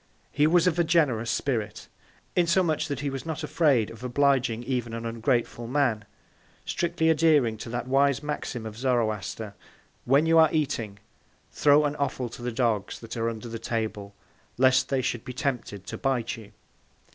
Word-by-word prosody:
He 150 +1 +3
was 170 +1 +4
of 175 -2 +1
a - - +5
generous 140 -9 +2
Spirit; 110 -6 -2 0.5
insomuch, 170 -3 +2
that 140 -3 -4
he 145 -1 -2
was 135 -1 -5
not 160 -2 -5
afraid 145 -7 +2
of 115 +1 -12
obliging 125 -2 +1
even 120 -2 -2
an 115 0 -5
ungrateful 115 0 -1
Man; 125 -5 0 0.6
strictly 170 -1 +1
adhering 150 -7 +3
to 115 - -7
that 120 +1 -4
wise 140 +1 +2
Maxim 145 -6 -4
of 110 -1 -7
Zoroaster. 110 -4 -1 0.6
_When 140 +4 +5
you 165 0 +5
are 160 -1 +6
eating, 115 -10 -1 0.5
throw 145 +1 +4
an 145 0 -1
Offal 130 -3 -2
to 120 - -11
the 120 0 -3
Dogs 115 -4 -1
that 115 -1 -8
are 115 0 0
under 115 0 -7
the 115 0 -6
Table, 105 -4 -4 0.4
lest 130 +1 +4
they 135 -2 0
should 120 -2 -2
be 125 - -7
tempted 125 - -3
to - - -7
bite 130 -4 -1
you. 110 -2 -13
125 Hz, 170 wpm, -26 LUFS, 115-145 Hz, 0.6 s, are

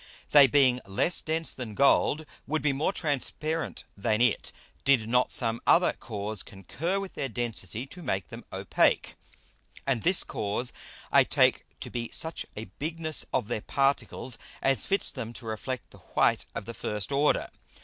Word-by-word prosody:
They 145 -2 +9
being 130 -1 +4
less 100 - +2
dense 160 +1 -1
than 115 -5 -6
Gold 145 +3 +3 0.2
would 155 +2 0
be 150 -2 +3
more 145 +7 +1
transparent 155 -1 -2
than 110 +2 0
it, 120 -3 +2 0.3
did 130 -6 +3
not 125 +2 +2
some 115 -1 0
other 175 +1 +5
Cause 105 -3 -4
concur 160 - -3
with 195 -1 -6
their 135 - -3
Density 115 -2 -4
to 180 +6 -11
make 95 - -2
them - - -9
opake. - - +1 0.7
And 130 -5 +1
this 180 +2 +4
Cause 105 +4 -2 0.4
I - - +7
take - - +2
to - - -6
be 120 -1 -3
such 160 0 -1
a 110 - -4
Bigness 160 +1 -1
of - - 0
their 110 -2 -2
Particles 135 -2 0 0.2
as 135 -1 +1
fits 195 0 +2
them 115 0 -6
to 120 - -10
reflect 115 +4 -4
the - - -15
white - - +1
of - - -4
the 115 - -6
first 105 +1 -4
order. 140 +2 +2
130 Hz, 165 wpm, -28 LUFS, 110-155 Hz, 0.7 s, They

